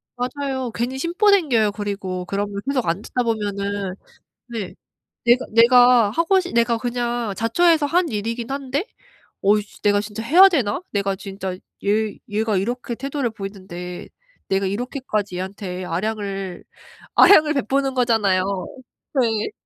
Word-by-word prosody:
맞아요. 260 0 -3
괜히 250 +3 -2
심보 350 +8 +1
생겨요. 255 - +3
그리고 195 -3 -4
그러면 200 +1 -3
계속 265 -4 0
안 170 +5 0
듣다 250 +2 -2
보면은 200 -3 -2 0.5
네. 225 -6 -5 0.5
내가 240 +2 +4
내가 240 -1 +6
하고 335 - +2
싶 360 - -7
내가 235 0 +2
그냥 240 -3 -2
자처해서 310 +7 +3
한 345 +2 +1
일이긴 230 +3 -3
한데 275 +4 -2 0.6
'어이씨 205 +1 +1
내가 205 0 +3
진짜 215 +1 -6
해야 360 +11 +7
되나?' 270 - 0
내가 200 -1 0
진짜 190 -1 -6 0.3
얘 210 +1 +1
얘가 215 -1 0
이렇게 240 +4 -2
태도를 275 -1 -3
보이는데 185 -4 -8 0.4
내가 195 0 +1
이렇게까지 215 -3 -3
얘한테 185 -1 -5
아량을 195 0 -4 0.5
아량을 310 -6 +7
베푸는 275 +1 0
거잖아요. 220 -7 +2 0.8
네. 225 - 0
225 Hz, 300 characters per minute, -21 LUFS, 200-255 Hz, 0.8 s, 해야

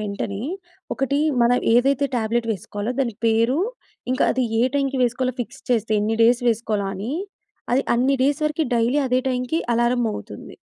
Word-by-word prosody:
వెంటనే, 200 0 -4 0.5
ఒకటీ 275 +1 0 0.2
మనం 245 +1 +4 0.2
ఏదైతే 275 +3 +3
టాబ్లెట్ 230 +1 0
వేసుకోవాలో 205 +4 -4
దాని 235 -5 -1
పేరు, 230 +5 +2 0.5
ఇంకా 255 - +2
అది 260 0 0 0.2
ఏ - - +4
టైమ్‌కి 275 -2 0
వేసుకోవాలో 250 +1 0
ఫిక్స్ 230 - -7
చేస్తే, 225 -2 +1
ఎన్ని 220 +2 0
డేస్ 240 +2 +4
వేసుకోవాలో 215 -3 0
అని, 210 +8 -4 0.6
అది 265 +3 +3
అన్ని 255 +3 +2
డేస్ 285 +3 +1
వరికి 305 +1 -1
డైలీ 240 +5 +2
అదే 255 +1 +2
టైమ్‌కి 250 +6 -1
అలారం 240 +1 +2
మోగుతుంది. 210 - -8
245 Hz, 155 wpm, -22 LUFS, 225-260 Hz, 0.6 s, మనం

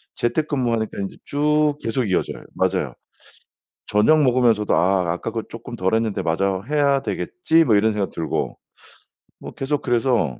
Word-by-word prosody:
재택근무하니까 120 -5 -1
이제 - - -14
쭉 150 0 +1
계속 115 +2 -1
이어져요. 90 - -1
맞아요. - - 0 0.9
저녁 150 +10 +4
먹으면서도 120 -5 +3
'아 95 +2 +3
아까 90 +6 -4
그거 115 - -3
쪼끔 120 +1 -8
덜 95 0 0
했는데 110 -2 0
마저 95 +3 0
해야 140 -2 +2
되겠지?' 165 - +1
뭐 110 - +4
이런 110 +2 +3
생각 100 -2 -2
들고 80 -2 -3 0.8
뭐 - - -9
계속 140 +2 -2
그래서 120 - +1
115 Hz, 330 characters per minute, -22 LUFS, 100-140 Hz, 0.9 s, 저녁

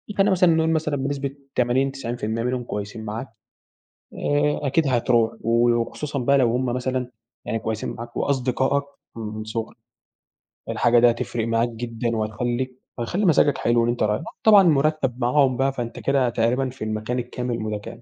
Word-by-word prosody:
فخلينا 195 +1 +3
مثلًا 180 -3 +4
نقول 160 0 +2
مثلًا 155 -2 0
بنسبة 140 0 -3 0.2
80، 130 +2 +2
90% 115 -4 -3
منهم 125 0 -1
كويسين 105 0 -6
معاك، 110 +5 -5 0.9
آآ 145 0 +1
أكيد 140 +2 +2
هتروح 120 -2 +2
و 115 +1 +3
وخصوصًا 120 +5 -2
بقى 140 +2 +3
لو 125 -3 +3
هم 125 +2 0
مثلًا 125 0 -2 0.3
يعني 115 - -2
كويسين 110 0 -3
معاك 120 0 -8
وأصدقائك 135 +1 +1 0.3
من 110 -1 -5
صغرك، 110 +1 -5 0.9
الحاجة 120 0 +3
دي 120 +1 +6
هتفرق 115 -1 -3
معاك 115 +1 +1
جدًا، 115 0 -3
وهتخليك 120 +4 -2 0.2
وهتخلي 170 - -1
مزاجك 150 -4 +4
حلو 120 0 +2
وأنتَ 120 +1 0
رايح، 105 +7 0 0.2
طبعًا 210 -2 +8
المرتب 150 -6 +2
معاهم 130 +1 +3
بقى 135 0 +1
فأنتَ 120 -3 -5
كده 135 -2 +2
تقريبًا 120 +3 +1
في 125 -2 -8
المكان 110 +3 -2
الكامل 125 0 -3
المتكامل. 110 +1 -5
125 Hz, 155 wpm, -23 LUFS, 115-135 Hz, 0.9 s, طبعًا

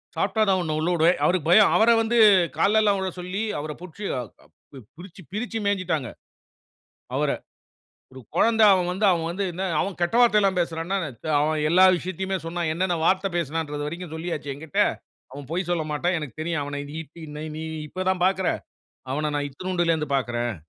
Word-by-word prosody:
சாப்பிட்டா 220 - 0
தான் 190 -1 +3
உன்ன 155 -2 -2
உள்ள 165 +3 0
உடுவேன். 165 +2 +3
அவருக்கு 175 -3 +1
பயம். 210 +3 +7
அவர 225 +2 +5
வந்து 235 +1 0 0.4
கால்லல்லா 210 0 +3
விழ 190 0 -2
சொல்லி 185 +4 -4 0.2
அவர 150 +1 -5
புடிச்சு 185 +3 -10 0.9
பிரிச்சு, 185 +1 -12
பிரிச்சு 225 +2 -3
மேய்ஞ்சுட்டாங்க. 180 -9 -1 1.1
அவர, - - +1 0.8
ஒரு 130 - -11
கொழந்த 225 -1 +3
அவன் 180 -2 +2
வந்து, 200 +4 -2
அவன் 165 -1 -1
வந்து 195 +2 -2 0.3
அவன் 195 -2 -3
கெட்ட 175 +7 +1
வார்த்தயெல்லாம் 205 -5 +4
பேசுறான்னா, 170 +3 -2 0.4
அவன் 155 0 0
எல்லா 185 +2 +6
விஷயத்தையுமே 190 +2 -3
சொன்னான். 170 -1 -2
என்னென்ன 180 0 0
வார்த்த 190 +2 +2
பேசுனான்ற 155 -2 -2
வரைக்கு 170 +3 -6
சொல்லியாச்சு 160 -4 -4
எங்கிட்ட. 150 0 -3 0.5
அவன் 140 -1 -9
பொய் 175 0 -2
சொல்லமாட்டான். 165 +1 0
எனக்குத் 150 0 -8
தெரியும். 165 -3 -1
அவன 145 0 -5 0.2
இ - - -4
பி 170 - -11
ந - - -6 0.2
நீ 160 - -5 0.2
இப்ப 185 +3 -4
தான் 180 -1 -1
பார்க்குற. 190 -1 +1 0.6
அவன 150 +1 -1
நான் 145 0 -2
இத்துனூண்டுல 175 +2 -1
இருந்து 150 -2 -4
பார்க்றேன். 120 -3 -2
175 Hz, 160 wpm, -24 LUFS, 155-190 Hz, 1.1 s, பயம்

